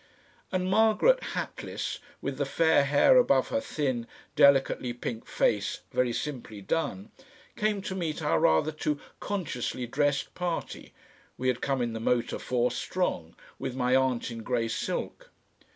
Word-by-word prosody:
And 185 -1 0
Margaret, 220 - +4 0.2
hatless, - - -4 0.2
with 140 0 -3
the 140 - +1
fair 160 -1 +3
hair 145 - +5
above - - +4
her 280 - 0
thin, 130 - -2 0.3
delicately 135 -3 +4
pink 120 -1 -5
face - - 0
very 125 -1 +2
simply 120 -5 -5
done, 100 -3 -2 0.4
came 210 -2 0
to 190 - -4
meet 170 -5 -2
our 150 -2 +1
rather 80 - +3
too 150 -1 -2 0.2
consciously 135 - -3
dressed 140 +3 0
party, 175 -2 -4 0.5
we 130 - 0
had 125 -1 -1
come 135 -3 0
in 120 -1 -2
the 110 - -4
motor 120 +1 0
four 125 -1 0
strong, 120 - -2 0.2
with 130 - -4
my 125 0 +2
aunt 130 -2 +1
in 115 -1 -6
grey 115 0 0
silk. - - -4
135 Hz, 150 wpm, -28 LUFS, 120-165 Hz, 0.5 s, hair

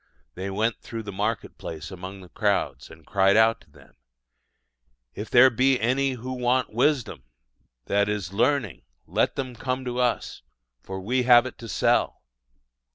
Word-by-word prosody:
They 95 +2 -5
went 110 +4 -1
through 115 -1 -6
the 100 - -6
market 105 +3 -3
place 80 -2 -7
among 95 +1 -8
the 90 - -14
crowds, 65 - -1
and 80 -1 -15
cried 100 0 +3
out 110 0 +4
to - - -23
them: 70 -2 -20 1.2
"If 105 +1 -7
there 130 +2 +7
be 130 +2 +2
any 130 +4 +1
who 125 +1 -6
want 125 -1 0
wisdom 125 - 0 0.6
(i.e., 100 +1 +1
learning), 120 - 0 0.2
let - - 0
them 130 -2 -4
come 130 +2 -3
to 125 0 -3
us, 125 -1 -1 0.4
for 95 +6 -6
we 125 +7 0
have 120 -1 +6
it 130 - -8
to 115 - -9
sell." - - +1
115 Hz, 160 wpm, -25 LUFS, 95-125 Hz, 1.2 s, there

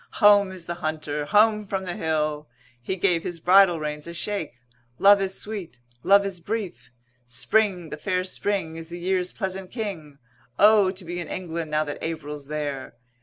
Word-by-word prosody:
Home 205 -2 +5
is 185 -3 -7
the 170 - -3
hunter, 155 -2 -2
home 215 +3 +4
from 190 -1 -2
the 180 -2 -4
hill. 155 -2 -1 0.3
He 155 +10 -3
gave 175 -3 +2
his 170 0 -5
bridle 180 0 +5
reins 150 0 -4
a 170 - -7
shake. 195 - -3 0.4
Love 200 0 +6
is 190 0 -1
sweet, 200 - -6 0.2
love 200 +4 +5
is 195 -3 -4
brief. 195 - -5 0.4
Spring, 175 - 0
the 150 - -5
fair 185 +2 -1
spring, 185 -3 -2
is 165 0 -8
the 175 - -6
year's 180 0 -1
pleasant 190 -2 -4
King. 180 - -6 0.4
O! 210 -2 +6
to 185 -1 -6
be 175 +1 -4
in 170 - -5
England 165 -3 -4
now 155 0 +1
that 145 -1 -6
April's 150 -3 -5
there. 145 -3 -4
175 Hz, 175 wpm, -25 LUFS, 155-195 Hz, 0.4 s, Love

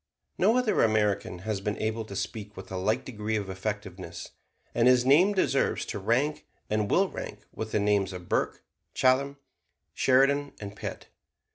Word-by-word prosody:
No 230 - +4
other 250 -4 +2
American 105 -4 +1
has 110 -3 -2
been 105 +1 -2
able 110 +1 -2
to 100 - -8
speak 105 -1 -5
with 95 - -9
a - - -4
like 95 +4 0
degree 110 -3 -3
of 100 -3 -2
effectiveness; 95 -3 -5 0.4
and 120 +1 +3
his 125 -1 +5
name 170 +10 +5
deserves 140 -7 +1
to - - -4
rank, 125 +9 0 0.2
and 105 -1 +1
will 195 +1 +4
rank, - - -8
with 110 0 -5
the - - +1
names 100 -2 +2
of 90 -1 -8
Burke, - - -1 0.3
Chatham, 135 +2 +2 0.6
Sheridan 140 +2 +3
and 100 -1 -7
Pitt. - - -7
110 Hz, 165 wpm, -28 LUFS, 100-130 Hz, 0.6 s, his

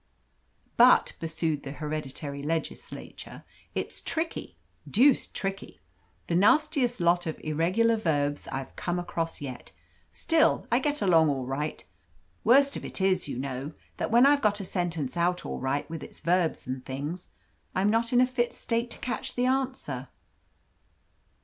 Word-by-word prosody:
"But," - - +6
pursued 160 -2 -2
the 140 0 -7
hereditary 150 -1 -5
legislator, 160 +2 -5 0.3
"it's - - -4
tricky 325 0 -3 0.3
deuced 260 +5 +4
tricky. 195 0 -4 0.5
The - - -3
nastiest 250 - +3
lot 175 0 +2
of 160 - -4
irregular 185 +10 +2
verbs 145 -7 0
I've 135 0 -5
come 175 0 -2
across 165 -2 -3
yet. 130 -3 -7 0.4
Still, 325 -1 +2
I 240 - +4
get 290 0 0
along 165 -5 +5
all 135 -3 -1
right. 140 +4 -3 0.6
Worst 275 +4 +5
of - - -4
it - - -4
is, 190 -3 +2
you 140 - -4
know, 135 +3 -4 0.2
that - - -2
when 240 +3 +6
I've 285 0 +5
got 210 -1 +2
a 195 - -5
sentence 170 -7 -2
out 175 +1 0
all - - -4
right 135 +2 -1
with 165 -1 -6
its - - -10
verbs 175 -1 +1
and 130 0 -4
things, 145 +8 -5 0.5
I'm 195 +3 +3
not 230 +1 +2
in 245 - +4
a - - +6
fit 250 -1 -1
state 235 +1 -1
to - - -6
catch 240 -3 -4
the 245 - +1
answer." 255 - -1
175 Hz, 155 wpm, -28 LUFS, 150-235 Hz, 0.6 s, But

